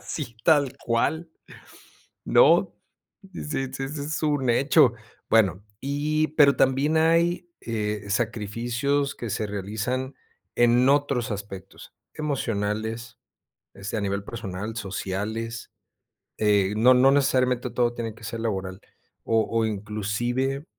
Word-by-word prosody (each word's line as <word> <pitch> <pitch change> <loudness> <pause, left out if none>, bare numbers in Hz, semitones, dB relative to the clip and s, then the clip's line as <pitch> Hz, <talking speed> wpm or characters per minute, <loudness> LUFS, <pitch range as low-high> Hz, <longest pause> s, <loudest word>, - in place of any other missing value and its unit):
Sí, 130 -7 -6
tal 140 -4 +3
cual, 150 +8 0 1.0
¿no? - - +5 0.6
Sí - - -6
sí 150 -3 -2
ese 135 0 -4
es 145 +2 -4
un 145 -4 +1
hecho. 135 +1 +4 0.4
Bueno, 100 -4 +3 0.2
y 150 +3 0
pero 140 -2 +6
también 135 +4 +2
hay, 170 +2 +2
eh, 105 -2 -3
sacrificios 120 +7 -1
que 120 - -6
se 105 - -2
realizan 110 +7 -3 0.4
en 120 +1 +4
otros 140 -4 +1
aspectos, 100 -1 -8 0.2
emocionales, 115 -4 -3 0.5
este, 100 +3 -5
a - - -1
nivel 100 0 -2
personal, 105 -1 -6
sociales, 110 +3 -4 0.7
eh, 100 -2 +2
no 125 +3 +6
no 130 +2 +6
necesariamente 130 -3 +2
todo 120 -1 +1
tiene 115 -2 -4
que 115 0 -15
ser 115 +1 -5
laboral. 95 -4 -3 0.4
O 115 -1 +2
o 115 -1 +1
inclusive, 110 +6 -2
120 Hz, 120 wpm, -25 LUFS, 105-140 Hz, 1.0 s, pero